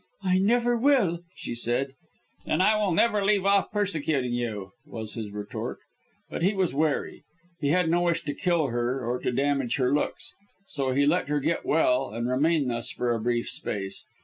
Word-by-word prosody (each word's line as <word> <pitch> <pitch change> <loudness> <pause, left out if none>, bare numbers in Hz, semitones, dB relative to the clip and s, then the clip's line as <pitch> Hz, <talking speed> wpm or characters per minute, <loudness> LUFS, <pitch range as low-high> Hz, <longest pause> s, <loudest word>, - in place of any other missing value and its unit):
"I 185 -1 +3
never 240 +4 +3
will!" 235 - +3 0.2
she - - -5
said. 120 +3 -1 0.6
"Then - - +1
I 210 +4 +4
will 210 -3 +1
never 210 +4 +3
leave 195 -1 +2
off 200 0 +3
persecuting 155 - 0
you," 110 -6 -3
was 110 -2 -7
his 110 -3 -5
retort. 105 0 -5 0.5
But - - -5
he 195 +4 +2
was 185 -7 +1
wary. 150 0 -1 0.4
He 145 - -1
had 175 +3 +3
no 170 +2 +2
wish 170 -1 +1
to 145 - -3
kill 170 -3 +1
her 120 +2 -1
or 125 +1 -1
to - - -1
damage 135 -1 0
her 130 0 +1
looks 145 - -2 0.3
so 135 -7 -1
he 140 +2 +3
let 170 +5 +2
her 150 0 +1
get 165 +4 -1
well 135 -4 +2
and 115 +3 -3
remain 145 +3 +2
thus 120 0 0
for 120 -1 -1
a 115 - -1
brief 120 +1 0
space. 95 -2 -3
145 Hz, 190 wpm, -27 LUFS, 120-180 Hz, 0.6 s, I